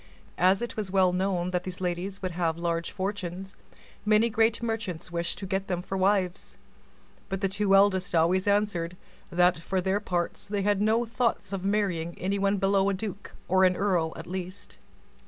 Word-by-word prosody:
As 190 Hz, +5 st, +4 dB
it 240 Hz, -, -5 dB
was 210 Hz, -3 st, -3 dB
well 185 Hz, -1 st, +3 dB
known 180 Hz, -1 st, 0 dB
that 180 Hz, -1 st, -1 dB
these 185 Hz, -1 st, -6 dB
young -, -, -6 dB
ladies 180 Hz, +2 st, -3 dB
would 185 Hz, -, -1 dB
have 165 Hz, -1 st, -1 dB
large 170 Hz, 0 st, -1 dB
fortunes, 190 Hz, -1 st, -4 dB, 0.5 s
many 215 Hz, +2 st, +3 dB
great 225 Hz, +2 st, +2 dB
merchants 220 Hz, -8 st, -3 dB
wished 170 Hz, 0 st, -2 dB
to 195 Hz, -, -6 dB
get 195 Hz, 0 st, -2 dB
them 180 Hz, -1 st, -2 dB
for 195 Hz, -, -4 dB
wives; 190 Hz, -1 st, 0 dB, 0.7 s
but 195 Hz, 0 st, -3 dB
the 195 Hz, -, +2 dB
two 195 Hz, 0 st, +2 dB
eldest 195 Hz, -2 st, +3 dB
always 180 Hz, +4 st, +3 dB
answered, 200 Hz, -4 st, +1 dB, 0.3 s
that, 180 Hz, 0 st, +3 dB
for 190 Hz, +3 st, -2 dB
their 190 Hz, +2 st, +1 dB
parts, 175 Hz, -4 st, -3 dB
they 200 Hz, -1 st, -1 dB
had 205 Hz, 0 st, +2 dB
no 220 Hz, +3 st, +2 dB
thoughts 235 Hz, -4 st, -1 dB
of 190 Hz, -2 st, -3 dB
marrying 190 Hz, -5 st, -1 dB
anyone 200 Hz, +1 st, 0 dB
below 195 Hz, 0 st, +2 dB
a 200 Hz, -, 0 dB
duke 200 Hz, 0 st, -6 dB
or 190 Hz, +1 st, +4 dB
an 185 Hz, -1 st, +4 dB
earl 180 Hz, -5 st, +1 dB
at -, -, -8 dB
least. 185 Hz, +1 st, -6 dB
190 Hz, 185 wpm, -27 LUFS, 180-200 Hz, 0.7 s, As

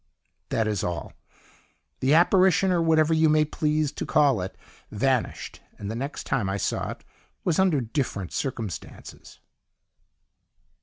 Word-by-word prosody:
"That 110 Hz, -1 st, 0 dB
is 105 Hz, -3 st, -1 dB
all. 85 Hz, -4 st, -4 dB, 0.9 s
The 135 Hz, +4 st, +3 dB
apparition, 185 Hz, +2 st, +4 dB
or 175 Hz, -2 st, +2 dB
whatever 160 Hz, -1 st, +3 dB
you 160 Hz, 0 st, +4 dB
may 155 Hz, 0 st, +4 dB
please 150 Hz, -1 st, 0 dB
to -, -, -5 dB
call 140 Hz, -9 st, +3 dB
it, 95 Hz, -, -6 dB, 0.3 s
vanished, 125 Hz, +3 st, -1 dB, 0.2 s
and 100 Hz, 0 st, -5 dB
the -, -, -4 dB
next 140 Hz, +5 st, -4 dB
time 110 Hz, -8 st, -1 dB
I 95 Hz, -, -1 dB
saw -, -, -2 dB
it -, -, -8 dB, 0.4 s
was 175 Hz, -2 st, +1 dB
under 180 Hz, -8 st, +3 dB
different 115 Hz, -, -3 dB
circumstances." 115 Hz, -, -6 dB
140 Hz, 140 wpm, -25 LUFS, 110-160 Hz, 0.9 s, apparition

